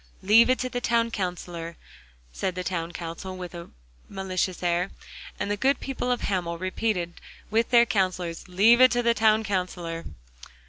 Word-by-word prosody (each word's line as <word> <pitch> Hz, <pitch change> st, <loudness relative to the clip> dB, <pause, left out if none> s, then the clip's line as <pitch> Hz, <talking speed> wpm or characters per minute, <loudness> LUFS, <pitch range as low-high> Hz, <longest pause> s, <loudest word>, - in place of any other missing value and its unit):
'Leave 225 Hz, +5 st, +6 dB
it 255 Hz, -, +4 dB
to 255 Hz, -, -2 dB
the 245 Hz, -1 st, -4 dB
Town 230 Hz, -1 st, +1 dB
Counsellor,' 175 Hz, -4 st, -4 dB, 0.6 s
said 185 Hz, -2 st, -2 dB
the 185 Hz, -, -3 dB
town 170 Hz, -2 st, -3 dB
council 175 Hz, +3 st, -6 dB
with 180 Hz, -1 st, -7 dB
a 170 Hz, 0 st, -8 dB, 0.4 s
malicious 185 Hz, -2 st, -2 dB
air. 175 Hz, +2 st, +1 dB, 0.5 s
And 200 Hz, -, -2 dB
the -, -, +1 dB
good 265 Hz, +6 st, +2 dB
people 255 Hz, -2 st, -3 dB
of 245 Hz, -, 0 dB
Hamel 175 Hz, -4 st, -2 dB
repeated 185 Hz, -1 st, -2 dB, 0.3 s
with 225 Hz, +1 st, +2 dB
their 235 Hz, -1 st, +6 dB
counsellors, 185 Hz, -5 st, -1 dB
'Leave 215 Hz, +7 st, +5 dB
it 255 Hz, -, +9 dB
to 245 Hz, 0 st, +1 dB
the 235 Hz, 0 st, +4 dB
Town 220 Hz, 0 st, +3 dB
Counsellor. 180 Hz, -4 st, -3 dB
190 Hz, 170 wpm, -26 LUFS, 175-230 Hz, 0.6 s, it